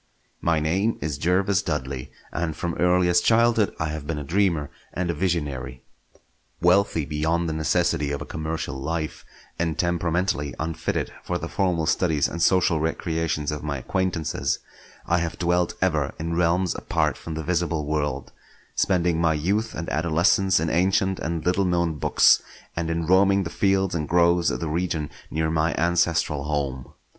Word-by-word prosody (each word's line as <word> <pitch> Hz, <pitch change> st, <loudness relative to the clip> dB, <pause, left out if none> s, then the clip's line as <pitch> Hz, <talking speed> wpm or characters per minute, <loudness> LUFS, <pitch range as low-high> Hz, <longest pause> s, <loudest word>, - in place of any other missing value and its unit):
My 85 Hz, -2 st, +2 dB
name 95 Hz, +9 st, 0 dB
is 75 Hz, -2 st, -3 dB
Jervas 90 Hz, +3 st, +2 dB
Dudley, 65 Hz, -5 st, -4 dB, 0.2 s
and 80 Hz, -2 st, -2 dB
from 85 Hz, +1 st, -3 dB
earliest 90 Hz, 0 st, +3 dB
childhood 115 Hz, -2 st, +3 dB
I 80 Hz, -, -1 dB
have 75 Hz, -1 st, -5 dB
been 80 Hz, -1 st, -2 dB
a 75 Hz, -, -4 dB
dreamer 85 Hz, -2 st, 0 dB, 0.2 s
and 90 Hz, -1 st, -1 dB
a -, -, -3 dB
visionary. 75 Hz, -7 st, -2 dB, 0.8 s
Wealthy 90 Hz, -2 st, +3 dB
beyond 80 Hz, +3 st, 0 dB
the 80 Hz, -, -2 dB
necessity 75 Hz, -2 st, +1 dB
of 70 Hz, -, -2 dB
a 75 Hz, -, -6 dB
commercial 80 Hz, -2 st, -4 dB
life, 80 Hz, +1 st, -3 dB, 0.4 s
and 80 Hz, -2 st, -1 dB
temperamentally 85 Hz, -3 st, 0 dB
unfitted 80 Hz, +1 st, -2 dB
for 90 Hz, -, -2 dB
the 85 Hz, -, -5 dB
formal 90 Hz, -3 st, 0 dB
studies 80 Hz, -3 st, +2 dB
and 85 Hz, -, -5 dB
social 90 Hz, -2 st, +3 dB
recreations 80 Hz, -1 st, -1 dB
of 75 Hz, -, -4 dB
my 75 Hz, -2 st, -3 dB
acquaintances, 80 Hz, -2 st, -1 dB, 0.5 s
I 85 Hz, +1 st, +2 dB
have 85 Hz, -1 st, -3 dB
dwelt 90 Hz, 0 st, +1 dB
ever 75 Hz, -6 st, 0 dB
in 85 Hz, +1 st, -3 dB
realms 90 Hz, +1 st, +2 dB
apart -, -, 0 dB
from 80 Hz, -, -7 dB
the 80 Hz, -, -4 dB
visible 85 Hz, -2 st, -1 dB
world; 75 Hz, -4 st, -2 dB, 0.4 s
spending 85 Hz, -3 st, +1 dB
my 80 Hz, -2 st, +3 dB
youth 100 Hz, +9 st, -1 dB
and 85 Hz, -, -4 dB
adolescence 85 Hz, +4 st, +3 dB
in 80 Hz, 0 st, -1 dB
ancient 95 Hz, +2 st, +2 dB
and 80 Hz, -1 st, -3 dB
little 90 Hz, +2 st, +2 dB
known 85 Hz, -3 st, 0 dB
books, -, -, +5 dB, 0.3 s
and 85 Hz, -1 st, -2 dB
in 85 Hz, 0 st, -1 dB
roaming 95 Hz, +2 st, +4 dB
the 80 Hz, -, -5 dB
fields 95 Hz, -1 st, +1 dB
and 75 Hz, -3 st, -2 dB
groves 85 Hz, 0 st, +4 dB
of -, -, -3 dB
the 85 Hz, -, -2 dB
region 80 Hz, -2 st, -2 dB, 0.2 s
near 80 Hz, 0 st, -1 dB
my 80 Hz, +1 st, +1 dB
ancestral 85 Hz, -3 st, +1 dB
home. 70 Hz, -4 st, -3 dB
85 Hz, 165 wpm, -24 LUFS, 75-90 Hz, 0.8 s, books